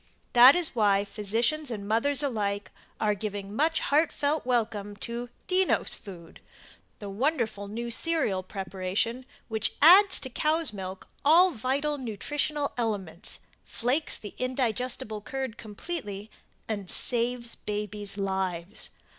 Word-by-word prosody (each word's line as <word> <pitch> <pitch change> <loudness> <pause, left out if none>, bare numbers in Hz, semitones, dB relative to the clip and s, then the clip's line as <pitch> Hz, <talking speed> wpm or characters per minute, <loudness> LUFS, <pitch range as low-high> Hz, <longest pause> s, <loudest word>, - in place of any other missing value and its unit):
That 250 +4 +9
is 350 -6 +1
why 205 -3 +3
physicians 230 +9 0
and 205 -4 -5
mothers 270 +6 +2
alike 205 -6 -2 0.3
are 210 -1 +2
giving 205 0 -5
much 320 +5 +1
heartfelt 295 -1 +1
welcome 215 -4 -1
to 235 +3 -6 0.2
DENNOS 375 0 +3
FOOD 175 -5 -12 0.6
the 205 - -8
wonderful 225 -3 -1
new 235 +3 -5
cereal 270 - 0
preparation 195 +6 -3 0.2
which 220 -2 +1
adds 375 +6 +8
to 260 - -3
cow's 310 0 +1
milk 190 -1 -7 0.2
all 345 +5 +6
vital 280 +4 -1
nutritional 285 +5 -2
elements 200 -5 -3 0.2
flakes 255 +7 0
the 205 - -9
indigestible 250 -3 -2
curd 260 +1 -5
completely, 210 - -6 0.4
and 205 -4 -4
Saves 240 0 +1
Babies' 210 -1 -4
Lives. 190 -2 -3
230 Hz, 120 wpm, -27 LUFS, 205-280 Hz, 0.6 s, That